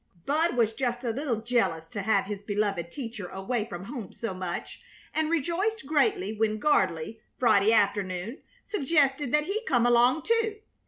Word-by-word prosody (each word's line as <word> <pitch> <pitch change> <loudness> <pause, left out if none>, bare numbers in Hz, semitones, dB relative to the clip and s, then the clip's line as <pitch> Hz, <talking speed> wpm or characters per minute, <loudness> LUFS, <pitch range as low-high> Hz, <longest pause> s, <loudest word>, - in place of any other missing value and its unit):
Bud 310 -1 +1
was 225 -2 +3
just 245 0 -2
a 235 - 0
little 245 -3 -2
jealous 225 -9 0
to 205 - -3
have 200 -1 +2
his 200 0 -5
beloved 200 -4 -1
teacher 230 -8 -6
away 210 +5 -2
from 175 -4 -7
home 230 -2 -7
so 230 -4 -4
much, 185 -2 -5 0.3
and 315 0 0
rejoiced 340 +6 0
greatly 320 - +1
when 215 0 0
Gardley, 195 - +1 0.2
Friday 220 -3 +4
afternoon, 200 - 0 0.3
suggested 285 - +1
that 300 +1 +3
he 415 +6 -2
come 240 -2 +3
along, 245 +5 +4
too. 450 -2 +1
235 Hz, 160 wpm, -28 LUFS, 205-295 Hz, 0.3 s, Friday